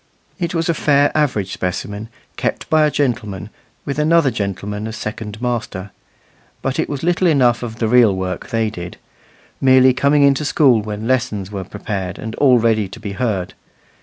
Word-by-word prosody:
It 175 -1 -2
was 165 +1 0
a 170 - +2
fair 145 -2 +3
average 115 -11 0
specimen, 100 +4 -4 0.3
kept - - -3
by 155 -1 +5
a - - +1
gentleman, 120 -10 -2 0.3
with 140 +1 -3
another 155 -2 +3
gentleman 105 0 -4
as 110 - -6
second 110 -1 -6
master; 110 -5 -3 0.7
but 135 -1 -1
it - - 0
was 145 0 -4
little 175 +1 +2
enough 125 -7 +3
of 115 -2 -5
the 115 - 0
real 115 -4 +5
work 95 -1 -4
they 115 -2 0
did 90 -3 -8 0.6
merely 130 -1 +6
coming 140 +3 +3
into 140 +1 +3
school 135 -6 +4
when 105 +1 -5
lessons 120 -7 -1
were 100 -2 -4
prepared 95 -1 -5
and 110 0 -6
all 130 -4 +5
ready 110 -3 +2
to 95 - -11
be 105 -3 -5
heard. 100 -5 -2
115 Hz, 175 wpm, -19 LUFS, 105-140 Hz, 0.7 s, merely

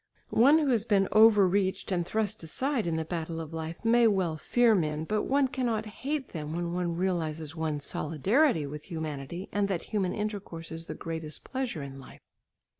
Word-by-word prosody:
One 275 +7 +6
who 300 -3 +2
has 230 -5 +3
been 200 -4 +2
overreached 200 -4 +4
and 175 -2 +1
thrust 215 +3 -1
aside 250 - -1
in 165 - 0
the 160 0 -2
battle 165 -1 -4
of 160 0 -7
life 160 +5 -6
may 235 0 +5
well 190 -6 +1
fear 235 +8 +3
men, 155 -5 0
but 210 +5 -1
one 275 0 +3
cannot 240 -4 -1
hate 265 +6 -4
them 155 -1 -5
when 170 0 -2
one 175 -1 -1
realises 160 -4 -2
one's 155 -3 -2
solidarity 170 - +2
with 150 +1 -7
humanity 160 +1 -5
and 205 -1 +1
that 190 -4 -2
human 190 -4 +1
intercourse 200 -6 -5
is 165 +1 -6
the - - -5
greatest 160 -2 -6
pleasure 255 - -3
in 135 -1 -8
life. 135 - -13
180 Hz, 185 wpm, -29 LUFS, 160-220 Hz, -, One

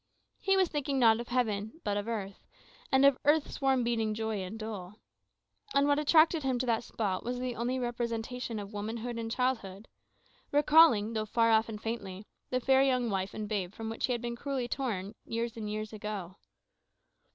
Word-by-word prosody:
He 390 0 +2
was 375 -1 +4
thinking 285 -3 -2
not 230 -3 +5
of 240 - -5
heaven, 220 +1 -1
but 205 -2 -1
of 205 +1 -2
earth, 200 -4 -5 0.4
and 265 +1 +5
of 280 -2 +5
"earth's 295 +1 +2
warm 265 -2 +3
beating 225 -2 0
joy 220 -2 -2
and 190 +4 -6
dole." 210 -4 -6 0.8
And 280 0 +5
what 285 0 +3
attracted 315 +2 +5
him 265 -2 0
to 250 - -1
that 230 -1 +1
spot 200 -5 -2
was 245 +1 -3
only 250 0 -2
the 255 - -2
representation 235 0 -3
of 205 0 -7
womanhood 225 +3 -4
and 225 0 -4
childhood, 225 -5 -2 0.6
recalling, 290 -7 +5
though 215 -1 -2
far 230 +1 +3
off 220 0 +3
and 215 -1 -6
faintly, 205 -3 -5 0.2
the 255 - 0
fair 265 +1 +4
young 255 -4 +2
wife 190 0 -2
and 215 -1 -4
babe 200 -3 -3
from 225 0 -5
whom 225 - -7
he - - +1
had 240 -1 -2
been 235 0 -3
cruelly 265 -1 -3
torn 215 -7 -3
years 230 +1 -3
and 215 -2 -5
years 215 +1 -4
ago. 205 -3 -6
230 Hz, 190 wpm, -31 LUFS, 215-255 Hz, 0.8 s, not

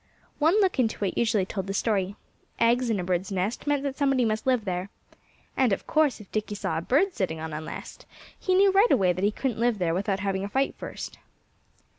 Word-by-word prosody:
One 325 +8 +4
look 375 -7 +1
into 220 -4 +1
it 190 - -2
usually 220 -5 +2
told 195 -1 -4
the 195 - -3
story. 200 -3 0 0.4
Eggs 235 +1 +3
in 215 -3 +1
a - - -2
bird's 180 +2 -1
nest 195 +9 -2
meant 290 -1 +1
that 275 -1 -3
somebody 270 -3 +3
must 220 +2 -1
live 250 -4 +2
there. 180 0 -3 0.7
And 255 -4 +3
of 195 - -1
course 305 -5 +2
if 210 - -14
Dickie 215 -1 -2
saw 160 -5 -2
a - - -5
bird 320 - +2
sitting 175 -6 -2
on 160 0 -5
a 150 - -4
nest 155 - -9 0.3
he 370 - +1
knew 390 +1 +5
right 400 +5 +5
away 185 -3 +4
that 185 +2 -4
he 205 - +4
couldn't 235 +1 -3
live 235 -1 +2
there 175 -3 0
without 195 +1 -1
having 195 -1 -1
a 200 - -4
fight 270 +6 0
first. - - -7
215 Hz, 225 wpm, -26 LUFS, 190-265 Hz, 0.7 s, knew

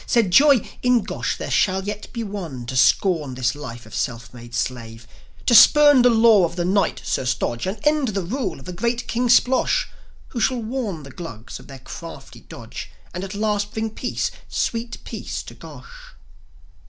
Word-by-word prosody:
Said 230 -7 +2
Joi: 275 +1 +5
"In 250 -3 +3
Gosh - - -3
there - - -5
shall 190 -1 +2
yet 205 +1 -6
be 230 - -4
one 175 - -6
To 130 - -5
scorn 145 +1 +2
this 125 0 0
life 120 -6 -8
of 110 - -15
a - - -5
self 120 -2 -3
made 120 -1 -10
slave; 115 -1 -4 0.4
To 245 - +3
spurn 290 +4 +8
the 245 - +6
law 225 -4 +5
of 170 0 -1
the 175 -1 -1
Knight, 195 +2 +1
Sir - - -1
Stodge, 125 +1 -2
And 195 +3 -3
end 300 -2 +3
the 200 -4 -2
rule 250 +10 -3
of - - -14
the 180 - -6
great 235 +6 -2
King 245 +1 0
Splosh; 260 - +3 0.4
Who 240 - -5
shall 240 +1 +1
warn 220 - -4
the 135 - -11
Glugs 125 -9 -8
of - - -15
their 135 -2 -10
crafty 165 +5 -10
dodge, - - -9 0.2
And 180 - -5
at 195 +1 -6
last 210 -1 -1
bring 220 0 -2
peace, 245 +3 -3 0.2
sweet 230 0 -2
peace, 220 - -6
to - - -11
Gosh." 145 -5 -13
200 Hz, 190 wpm, -22 LUFS, -, 0.4 s, spurn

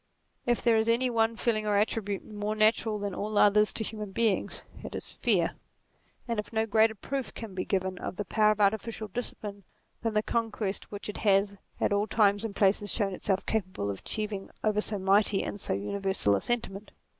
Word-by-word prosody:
If 240 -1 +1
there 235 -2 +4
is 220 +1 +2
any 245 +2 +3
one 225 0 +2
feeling 220 -2 0
or 205 -1 +3
attribute 205 -1 -1
more 210 0 -3
natural 215 0 +3
than 205 -1 -3
all 210 +3 -3
others 210 +1 +5
to 220 - 0
human 215 -1 -5
beings, 220 -1 0 0.2
it - - -6
is - - -6
fear; - - +1 0.8
and 230 -3 0
no 220 -1 +1
greater 220 +1 +3
proof 270 +5 -4
can 225 -4 -7
be 185 0 -3
given 190 -2 -1
of - - -5
the 205 - -3
power 215 +2 +3
of 215 0 +1
artificial 215 +1 0
discipline 205 -2 -4 0.4
than 225 -2 -1
the 210 - +3
conquest 220 -4 -2
which 205 -1 -6
it 210 - -5
has 200 -1 +3 0.2
at - - +2
all 205 +1 +1
times 205 -1 +3
and 215 -3 -4
places 205 0 +2
shown 200 -4 0
itself 190 +1 -1
capable 185 - -1
of 95 - -6
achieving 210 -2 -4
over 210 -1 +2
so 210 -1 -3
mighty 195 +1 +3
and 205 - -4
so - - -1
universal 105 - 0
a 100 - -1
sentiment. 215 -4 -3
210 Hz, 195 wpm, -29 LUFS, 200-220 Hz, 0.8 s, others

